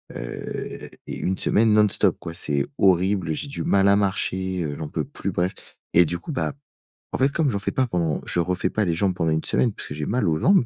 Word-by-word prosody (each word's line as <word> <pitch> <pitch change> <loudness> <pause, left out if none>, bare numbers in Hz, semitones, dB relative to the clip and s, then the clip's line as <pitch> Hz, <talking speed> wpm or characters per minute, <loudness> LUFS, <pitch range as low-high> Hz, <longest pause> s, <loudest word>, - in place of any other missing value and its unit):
heu, - - -6 0.2
et - - -5
une 95 +1 -1
semaine 110 0 +3
non-stop, 105 -1 +3
quoi. 85 - -7
C'est 70 -5 +1
horrible, 95 -3 +3
j'ai 145 - -4
du - - -4
mal 100 0 +4
à 100 - +6
marcher, 95 -2 -1
heu, 75 -2 -3
j'en 80 - -5
peux - - -2
plus, - - -4
bref. 90 +2 0 0.4
Et 85 0 +7
du 85 +3 -2
coup, 155 - -7
bah, 140 +1 -1 0.6
en - - 0
fait, 135 +2 +3
comme 155 -2 +1
j'en 100 -4 -1
fais 100 - -2
pas 130 -1 +1
pendant 85 -6 0
je 85 - 0
refais 90 +1 0
pas 105 - +1
les 85 - +1
jambes 95 +2 +1
pendant 80 -2 0
une 80 0 0
semaine 120 - +2
parce - - -8
que - - -4
j'ai 75 -1 -3
mal 110 -3 +1
aux 80 -1 +1
jambes 185 -9 +4
95 Hz, 240 wpm, -24 LUFS, 85-105 Hz, 0.6 s, Et